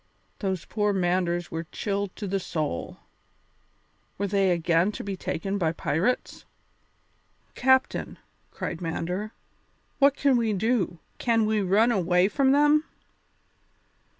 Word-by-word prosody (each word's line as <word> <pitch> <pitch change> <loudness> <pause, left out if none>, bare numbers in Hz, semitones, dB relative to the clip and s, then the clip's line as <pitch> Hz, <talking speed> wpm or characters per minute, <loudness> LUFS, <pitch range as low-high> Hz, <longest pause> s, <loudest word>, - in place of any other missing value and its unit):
Those 190 -4 -2
poor 210 -1 0
Manders 175 -2 0
were 165 0 -4
chilled 200 -2 -3
to 210 - -6
the 195 0 -1
soul. 155 - -4 1.2
Were 200 - -1
they 195 -1 +2
again 170 +2 +2
to - - -6
be 200 -1 -4
taken 195 +2 -3
by 165 -3 +1
pirates? 165 - -1 1.1
"Captain," 260 +1 +1 0.3
cried 175 - -5
Mander, 180 +5 -3 0.7
"what 280 0 +5
can 275 -3 +3
we 225 -2 +1
do, 200 -3 0 0.2
can 225 -2 +2
we 215 -1 +1
run 205 +5 +3
away 180 -3 +3
from 270 +2 +2
them?" 295 +2 +4
195 Hz, 125 wpm, -26 LUFS, 175-225 Hz, 1.2 s, what